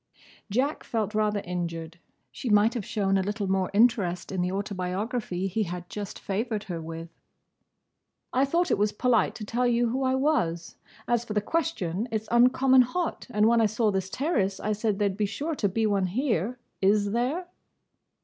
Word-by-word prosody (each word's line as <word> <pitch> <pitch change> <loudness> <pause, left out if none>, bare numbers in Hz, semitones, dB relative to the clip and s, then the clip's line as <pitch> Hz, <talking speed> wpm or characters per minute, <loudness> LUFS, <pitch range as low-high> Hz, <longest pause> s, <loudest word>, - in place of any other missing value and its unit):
Jack 260 +8 0
felt 220 -2 -2
rather 210 -1 +1
injured. 170 -2 -5 0.3
She 250 - -5
might 210 +2 +4
have 235 -5 -3
shown 195 -3 +1
a - - +2
little 205 +2 -2
more 190 -1 0
interest 200 -5 +2
in 190 -2 -1
the 180 +1 0
autobiography 195 +1 -2
he 195 +4 -1
had 180 -2 -4
just 205 -2 -6
favoured 210 +2 -2
her 170 -3 -5
with. 165 +1 -7 1.2
"I 260 +2 +3
thought 340 +5 +1
it - - +2
was 210 0 +2
polite 230 -2 +2
to 215 - -6
tell 245 +4 0
you 240 0 +2
who 260 +3 -1
I 260 0 +2
was. 235 - 0 0.3
As 240 -1 +1
for 225 - -5
the 210 - +2
question: 220 - -1
it 220 -1 -2
's - - -19
uncommon 255 +2 +5
hot, 330 +8 -2
and 210 -2 +3
when 230 0 +4
I 220 - +4
saw 215 +1 +1
this 190 -1 -2
terrace 205 - 0
I 215 - -2
said 215 -1 0
there 205 0 +2
'd 190 - -6
be 210 -1 +1
sure 295 +10 -3
to 210 -9 0
be 220 +4 0
one 200 -3 +1
here. 230 - -1 0.2
Is 200 +1 +3
there?" 260 - -1
210 Hz, 190 wpm, -27 LUFS, 190-245 Hz, 1.2 s, uncommon